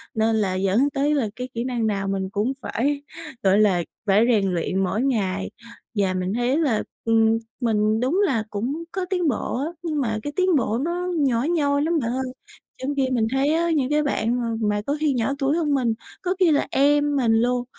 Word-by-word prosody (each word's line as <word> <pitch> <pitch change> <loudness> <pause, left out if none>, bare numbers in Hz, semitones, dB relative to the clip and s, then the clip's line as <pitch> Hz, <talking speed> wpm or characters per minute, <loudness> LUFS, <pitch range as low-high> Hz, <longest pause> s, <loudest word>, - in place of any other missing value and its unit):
nên 220 0 +2
là 195 -4 0
dẫn 195 +9 +2
tới 285 +2 +1
là 235 -7 0
cái 250 +1 -5
kỹ 235 - -2
năng 240 -3 -1
nào 195 -2 -1
mình 195 -1 -2
cũng 210 +6 -1
phải, 285 +5 -1 0.4
gọi 195 +1 +4
là, 190 -5 +3 0.2
phải 205 +3 +4
rèn 195 -4 +2
luyện 185 +2 0
mỗi 205 +4 -1
ngày. 200 -8 -1 0.5
Và 195 -3 +1
mình 185 +1 -2
thấy 245 +4 +1
là, 275 -10 +1 0.2
ừm, 225 0 +3 0.2
mình 215 -1 +2
đúng 280 +11 +1
là 230 - 0
cũng 255 +11 -3
có 375 -1 -2
tiến 360 -3 0
bộ 240 -3 -1
á, - - -2 0.2
nhưng 310 -4 -1
mà 220 -4 -1
cái 290 - -4
tiến 370 -3 +3
bộ 230 -4 +1
nó 345 +6 -2
nhỏ 255 -4 +2
nhoi 290 -3 +1
lắm 325 0 +1
bạn 235 -2 -2
ơi. 260 +1 -1 0.6
Trong 285 +2 -2
khi 270 -2 +1
mình 225 -3 +1
thấy 275 +3 +2
á 335 +1 +1
những 280 -5 +1
cái 300 0 +2
bạn 245 -3 0
mà 235 - -2 0.2
mà 205 0 0
có 285 - 0
khi 305 -2 +1
nhỏ 245 +2 0
tuổi 280 +2 +1
hơn 300 -4 +1
mình, 245 -4 +1 0.3
có 365 +1 -1
khi 360 -4 +5
là 290 - +2
em 290 +1 +3
mình 240 -5 +2
luôn, 245 +2 +2
250 Hz, 220 wpm, -23 LUFS, 215-290 Hz, 0.6 s, khi